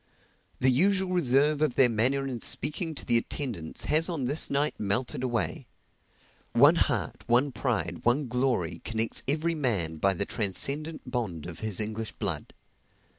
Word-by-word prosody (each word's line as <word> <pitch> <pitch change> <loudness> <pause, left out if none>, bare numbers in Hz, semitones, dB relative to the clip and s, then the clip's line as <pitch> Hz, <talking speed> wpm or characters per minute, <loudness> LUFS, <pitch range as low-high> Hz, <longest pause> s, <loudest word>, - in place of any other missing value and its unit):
The 130 0 +3
usual 190 +7 +2
reserve 145 -2 +2
of 150 -5 +1
their 130 - +6
manner 125 +5 0
in 125 -4 -5
speaking 155 +5 0
to - - -8
the 120 -2 +3
attendants 115 - -4
has 160 +3 +2
on 155 -7 -2
this 145 +5 +1
night 145 +2 0
melted 120 +6 0
away. 120 -3 -2 0.9
One - - +7
heart, - - -1
one 125 +4 +3
pride, 95 - -2
one 130 +5 +2
glory, 125 -8 -1
connects 115 0 -1
every 160 +4 0
man 105 - -1
by 95 +4 +2
the 100 - 0
transcendent 140 - +1
bond 105 - -3
of 85 -2 -8
his 110 -4 -1
English 110 +1 -2
blood. 90 -9 -3
125 Hz, 155 wpm, -27 LUFS, 110-145 Hz, 0.9 s, One